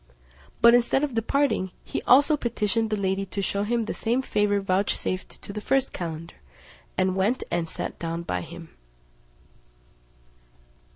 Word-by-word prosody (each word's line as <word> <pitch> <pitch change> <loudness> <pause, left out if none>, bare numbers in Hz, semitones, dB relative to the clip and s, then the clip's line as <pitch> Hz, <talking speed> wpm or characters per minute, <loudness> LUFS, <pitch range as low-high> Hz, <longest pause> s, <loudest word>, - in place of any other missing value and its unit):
But 235 0 +8
instead 245 +3 +3
of 290 -4 -1
departing, 230 -3 +1
he - - -4
also 285 +4 +6
petitioned 225 -3 0
the 215 - +1
lady 195 -1 0
to 200 - -5
shew 200 0 0
him 230 +2 0
the - - -3
same 240 +3 0
favour 205 -4 +1
vouchsafed 185 -1 -1
to 200 - -7
the 210 - -4
first 270 +3 +1
calender, 165 -2 -6 0.6
and 185 0 +2
went 205 +7 +1
and 165 -1 -1
sat - - -5
down 165 0 -3
by 90 - -2
him. 170 - -10
205 Hz, 150 wpm, -26 LUFS, 185-235 Hz, 0.6 s, But